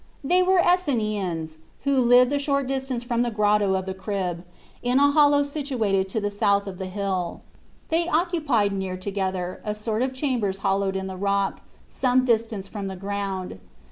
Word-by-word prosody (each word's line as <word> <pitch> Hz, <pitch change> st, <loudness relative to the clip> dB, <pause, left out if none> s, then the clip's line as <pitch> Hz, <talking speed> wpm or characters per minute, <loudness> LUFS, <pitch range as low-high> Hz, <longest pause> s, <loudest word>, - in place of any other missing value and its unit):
They 360 Hz, +6 st, +3 dB
were 375 Hz, +1 st, +3 dB
Esseniens, 215 Hz, -, 0 dB, 0.2 s
who 275 Hz, -1 st, +2 dB
lived 245 Hz, +2 st, +5 dB
a 285 Hz, -, +1 dB
short 280 Hz, -1 st, 0 dB
distance 265 Hz, -2 st, -3 dB
from 240 Hz, -1 st, 0 dB
the 240 Hz, -, +1 dB
Grotto 210 Hz, -2 st, +2 dB
of 190 Hz, 0 st, -2 dB
the 190 Hz, -, -3 dB
Crib, 190 Hz, -3 st, -3 dB, 0.4 s
in 245 Hz, +1 st, +1 dB
a 285 Hz, 0 st, +5 dB
hollow 290 Hz, -1 st, +5 dB
situated 250 Hz, -10 st, -1 dB
to 220 Hz, -, -1 dB
the 205 Hz, -1 st, -2 dB
south 200 Hz, 0 st, +2 dB
of 190 Hz, -2 st, -7 dB
the 190 Hz, -, -4 dB
hill. 185 Hz, -2 st, -3 dB, 0.5 s
They 335 Hz, +1 st, +1 dB
occupied 305 Hz, -, +1 dB
near 190 Hz, -1 st, -3 dB
together 185 Hz, -2 st, -3 dB
a 210 Hz, 0 st, -3 dB
sort 215 Hz, +1 st, -2 dB
of 260 Hz, +1 st, 0 dB
chambers 250 Hz, -8 st, -1 dB
hollowed 195 Hz, 0 st, +1 dB
in 190 Hz, 0 st, -2 dB
the 190 Hz, -1 st, -6 dB
rock, 200 Hz, 0 st, 0 dB, 0.3 s
some 255 Hz, 0 st, +1 dB
distance 225 Hz, -4 st, 0 dB
from 200 Hz, -1 st, -5 dB
the 190 Hz, -, -5 dB
ground. 195 Hz, -, -4 dB
210 Hz, 175 wpm, -24 LUFS, 190-265 Hz, 0.5 s, lived